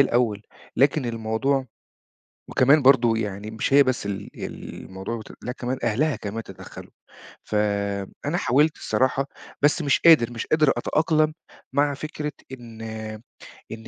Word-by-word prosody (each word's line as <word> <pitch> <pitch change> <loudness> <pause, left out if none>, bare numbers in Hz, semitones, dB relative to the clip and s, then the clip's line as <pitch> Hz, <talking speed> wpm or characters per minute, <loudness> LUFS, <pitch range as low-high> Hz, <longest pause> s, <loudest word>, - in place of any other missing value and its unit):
الأول. 120 -5 +2 0.3
لكن 140 0 +3
الموضوع 115 +4 -1 0.8
وكمان 140 +3 +4
برضه 120 -4 +5
يعني 105 0 -4
مش 110 +4 -2
هي 140 +1 +8
بس 130 -6 -1
ال 100 -1 -5
الموضوع 95 +5 -7
بت 110 - -11
لا 125 - -3
كمان 125 0 -4
أهلها 130 +5 +1
كمان 110 +2 -5
تدخَّلوا. - - -11 0.5
فأنا 100 - -1
حاولت 150 +1 +2
الصراحة، 135 +1 0 0.4
بس 150 +3 +3
مش 140 -2 +2
قادر، 155 -8 +6
مش 115 - -5
قادر 155 -3 +3
أتأقلم 155 +4 +1 0.4
مع 145 0 +2
فكرة 150 0 -5 0.2
إن 115 -3 -10 0.9
إن 110 0 -8
125 Hz, 130 wpm, -24 LUFS, 110-145 Hz, 0.9 s, هي